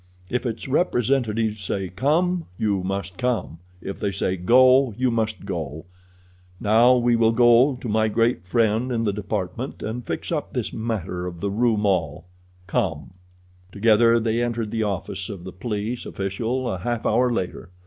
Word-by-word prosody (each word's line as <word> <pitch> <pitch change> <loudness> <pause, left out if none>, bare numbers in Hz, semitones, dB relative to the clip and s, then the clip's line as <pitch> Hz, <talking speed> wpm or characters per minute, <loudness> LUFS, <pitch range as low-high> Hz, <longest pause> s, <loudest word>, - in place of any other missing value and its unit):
If 125 +1 -1
its 115 +1 -5
representatives 120 - +1
say 95 0 -2
'Come,' 165 - +1
you 100 -3 0
must 95 -1 -4
come; 115 -10 -1 0.2
if 95 - -6
they 100 - -1
say 95 -1 -1
'Go,' 125 +5 +5
you 130 0 +1
must 110 -3 -2
go. 80 -4 -5 0.7
Now 115 +4 +5
we 120 -1 +3
shall 115 -1 +4
go 120 +3 +5
to 125 - -6
my 110 0 +2
great 115 -3 +1
friend 115 +5 +1
in 115 -2 0
the 105 -3 0
department 105 +4 -4
and 115 +3 -4
fix - - -4
up - - -3
this - - -3
matter 95 -6 -3
of 85 -1 -7
the 100 +3 -2
Rue 115 +1 +2
Maule. 90 -7 0 0.4
Come!" 90 - -2 0.6
Together 115 +3 +4
they 115 +1 0
entered 115 -3 -2
the 115 - -1
office 100 -2 -3
of 95 -5 -7
the 95 0 -8
police 105 +3 -4
official 115 +7 -2
a 95 - -2
half 120 +4 -3
hour 125 0 +3
later. 90 -6 -3
110 Hz, 165 wpm, -23 LUFS, 95-120 Hz, 0.7 s, Go